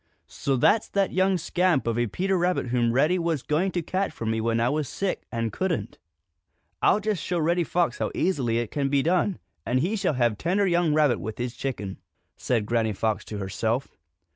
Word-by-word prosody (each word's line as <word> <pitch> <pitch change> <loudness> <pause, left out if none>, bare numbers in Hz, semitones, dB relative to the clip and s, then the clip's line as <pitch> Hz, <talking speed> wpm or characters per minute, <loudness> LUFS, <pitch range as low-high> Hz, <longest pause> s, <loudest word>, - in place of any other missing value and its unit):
"So 135 - -2
that's 210 - +3
that 195 -1 +1
young 190 +1 +3
scamp 175 -5 +1
of 115 0 0
a 120 - +1
Peter 190 - -1
Rabbit 175 -7 0
whom 120 -1 +2
Reddy 150 +9 +3
was 165 -5 -1
going 170 +6 0
to 175 - -1
catch 190 +4 -1
for 115 - -7
me 110 0 0
when 115 0 +1
I 115 - +2
was 150 0 -1
sick 195 -2 -3
and 115 -3 -2
couldn't! 185 -3 -2 0.8
I'll - - +4
just 210 -5 -1
show 180 - -1
Reddy 170 +2 +2
Fox 175 +1 0
how - - 0
easily 130 -11 +1
it 120 -2 -2
can 140 -2 0
be 140 -1 +2
done, 180 +3 +1 0.3
and 125 +2 +1
he 185 +10 0
shall 195 -8 0
have 120 -4 +1
tender 190 +4 +1
young 170 -4 +2
rabbit 150 -5 +3
with 110 +1 -6
his 125 0 -3
chicken!" 105 -9 -4 0.4
said 115 -5 0
Granny 115 -1 0
Fox 110 +2 -1
to 105 - -6
herself. 110 +6 -2
145 Hz, 205 wpm, -26 LUFS, 115-180 Hz, 0.8 s, I'll